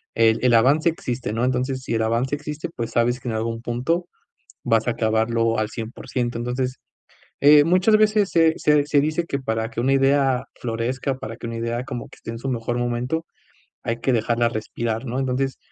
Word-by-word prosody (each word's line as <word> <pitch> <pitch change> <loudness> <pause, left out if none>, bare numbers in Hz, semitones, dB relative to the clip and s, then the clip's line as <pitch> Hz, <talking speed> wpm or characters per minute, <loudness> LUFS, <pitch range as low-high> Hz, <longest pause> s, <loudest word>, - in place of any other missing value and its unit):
el 115 -1 +4
el 125 -2 +4
avance 140 +8 +4
existe, 125 -8 -4
¿no? 115 - -1
Entonces, 130 +1 -1
si 115 - -2
el 110 - +1
avance 120 +5 0
existe, 150 +2 -6
pues 115 -1 -4
sabes 120 +2 +1
que - - -8
en 115 - -2
algún 115 +1 -2
punto 135 +10 -1 0.6
vas 115 +1 +2
a - - +3
acabarlo 115 0 +1
al 110 0 -1
cien 115 0 -6
por 125 - -11
ciento. 120 -2 -1
Entonces, 125 +2 -2 0.6
eh, 145 +1 +7
muchas 185 +6 +4
veces 215 -2 +3
se 165 -1 +4
se 150 -1 +3
se 145 -1 +3
dice 155 +4 0
que 140 - -2
para 110 -3 -2
que 115 - -4
una 130 +3 +2
idea 135 -1 +3 0.2
florezca, 125 +3 -2
para 115 -2 -7
que 115 - -8
una 115 - -5
idea 115 +1 -2
como 125 -3 -6
que - - -16
esté - - -8
en 115 - -6
su 135 +3 -5
mejor 120 0 -2
momento, 120 +7 -2 0.6
hay 115 0 -2
que 130 - +1
dejarla 115 +1 +1
respirar, 115 +1 -3
¿no? 125 +1 -2
Entonces, 135 0 -1
125 Hz, 205 wpm, -23 LUFS, 115-140 Hz, 0.6 s, eh